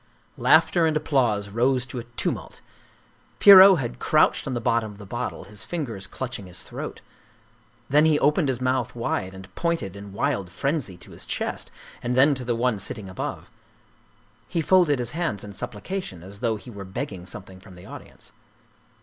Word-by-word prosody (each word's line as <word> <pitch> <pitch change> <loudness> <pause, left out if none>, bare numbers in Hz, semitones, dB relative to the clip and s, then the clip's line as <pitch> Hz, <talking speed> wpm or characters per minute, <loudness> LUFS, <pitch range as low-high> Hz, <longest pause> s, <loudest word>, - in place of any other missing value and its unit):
Laughter 160 +6 +4
and 155 -1 +1
applause 120 -10 +1
rose 125 +4 +1
to 130 -1 -6
a - - -6
tumult. - - -2 0.8
Pierrot 195 -1 +10
had 120 -5 -4
crouched 155 -1 +3
on 130 - -2
the - - -1
bottom 115 -1 0
of 100 - -14
the 105 - -10
bottle, 95 - -4
his 105 +1 -5
fingers 115 - -5
clutching 120 -3 -6
his 90 -1 -6
throat. - - -7 0.9
Then 150 +3 +4
he 155 -2 +4
opened 150 +2 +2
his 125 -2 -1
mouth 130 -2 -1
wide 95 -5 -2
and 95 0 -12
pointed 165 - -2
in 100 0 -9
wild 100 -1 -1
frenzy 135 - -2
to 90 - -14
his - - -7
chest - - -3 0.3
and 125 0 -1
then 140 +3 +6
to 130 -2 -4
the 120 -1 -1
one 120 -2 0
sitting 100 0 -3
above. 95 - -6 1.0
He 170 - -2
folded 170 -4 +4
his 120 -1 -2
hands 165 - -2
in 105 -1 -9
supplication, 105 - -6
as 100 +2 -11
though 115 -1 0
he 120 +3 -10
were 100 -2 -8
begging 95 -1 -6
something 95 -4 -8
from 95 -1 -15
the 90 - -13
audience. - - -12
120 Hz, 180 wpm, -25 LUFS, 100-145 Hz, 1.0 s, Pierrot